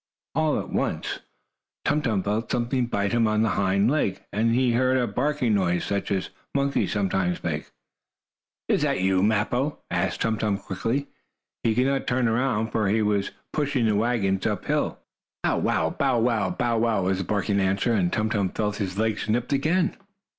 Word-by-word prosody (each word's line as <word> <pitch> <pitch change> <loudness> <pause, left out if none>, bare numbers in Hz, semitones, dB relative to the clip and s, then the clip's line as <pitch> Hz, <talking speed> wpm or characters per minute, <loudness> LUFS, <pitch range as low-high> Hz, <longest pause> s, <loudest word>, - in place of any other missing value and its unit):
All 155 -1 +1
at - - -6
once - - -2 0.7
Tum 150 +1 +2
Tum 110 -8 0
felt 105 +3 -2
something 120 +1 0
bite 100 -4 -1
him 120 -1 +3
on 110 0 +2
the 110 - +2
hind 100 +3 +2
leg, 120 -11 0
and 115 +2 +2
he 125 -1 +3
heard 130 +2 +2
a 125 - +2
barking 125 +1 0
noise, 90 -3 +1
such 100 0 -2
as 95 -2 -1 0.2
monkeys 140 0 +1
sometimes 95 -3 0
make. 75 -3 -3 1.0
"Is - - +2
that - - +1
you, 95 0 +2
Mappo?" 110 +7 +1
asked 90 0 -1
Tum 110 -1 0
Tum 105 -2 +1
quickly. 105 +8 -2 0.6
He 110 -1 +1
could 125 +2 +3
not 135 0 0
turn 125 0 +2
around, 115 -2 0
for 110 -2 +1
he 110 +2 +2
was 105 -2 +1 0.2
pushing 140 -5 +1
the 110 - +3
wagon 100 -4 +1
up - - -2
hill. - - 0 0.5
"Bow - - +1
wow! - - +1
Bow 135 -3 +1
wow! 115 -5 +1
Bow 120 -2 0
wow!" 110 -4 +1
was 95 +1 0
the - - -1
barking 100 +1 0
answer, 100 +5 +1
and 90 -5 +1
Tum 110 0 0
Tum 100 -4 +1
felt 105 +1 -2
his 95 -3 -3
legs 110 -1 -1
nipped 120 +5 0
again. 165 +6 +1
110 Hz, 185 wpm, -25 LUFS, 100-125 Hz, 1.0 s, him